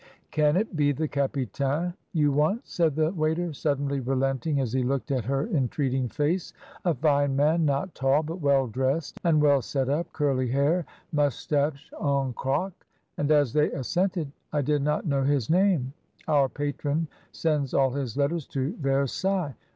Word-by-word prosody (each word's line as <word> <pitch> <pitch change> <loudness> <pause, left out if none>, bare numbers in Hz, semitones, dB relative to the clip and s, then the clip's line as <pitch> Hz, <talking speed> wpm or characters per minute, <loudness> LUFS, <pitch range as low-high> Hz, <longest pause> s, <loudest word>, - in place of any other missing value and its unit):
"Can 150 +1 +3
it 210 -2 -1
be 145 -2 +3
the 155 +3 -1
capitaine 140 - -1 0.2
you 150 -4 +2
want?" 155 - +1
said 165 -5 0
the 155 +1 +2
waiter, 160 0 -1
suddenly 140 -1 -1
relenting, 135 +3 0
as 125 -4 -1
he 130 - +2
looked 135 +2 -1
at 130 -5 0
her 135 +2 0
en 135 -6 +2
treating 135 -4 -1
face; 160 - -1 0.3
"a 175 -3 +2
fine 145 0 +2
man, 155 +4 +3
not 145 +6 0
tall, 135 +3 +2
but 165 +3 -6
well 140 -2 +3
dressed, 130 +6 -2
and 165 -3 +4
well 145 -2 +4
set 135 +2 -2
up, 160 +4 -1
curly 135 -4 0
hair, 145 +7 +1 0.2
moustache 145 +1 0
en 140 -3 +1
croc? 155 +11 -1 0.5
And 145 - 0
as 145 -5 +3
they 150 0 +3
assented, 175 +2 -1 0.2
"I 145 -1 0
did 145 +1 +1
not 150 +2 0
know 140 -4 +1
his 135 -2 +1
name; 175 -8 +2 0.3
our 145 -4 +3
patron 145 +3 -2 0.2
sends 150 -5 0
all 135 -1 +3
his 135 -3 -4
letters 145 +2 0
to 135 - -2
Versailles. 140 +4 0
145 Hz, 165 wpm, -26 LUFS, 135-155 Hz, 0.5 s, and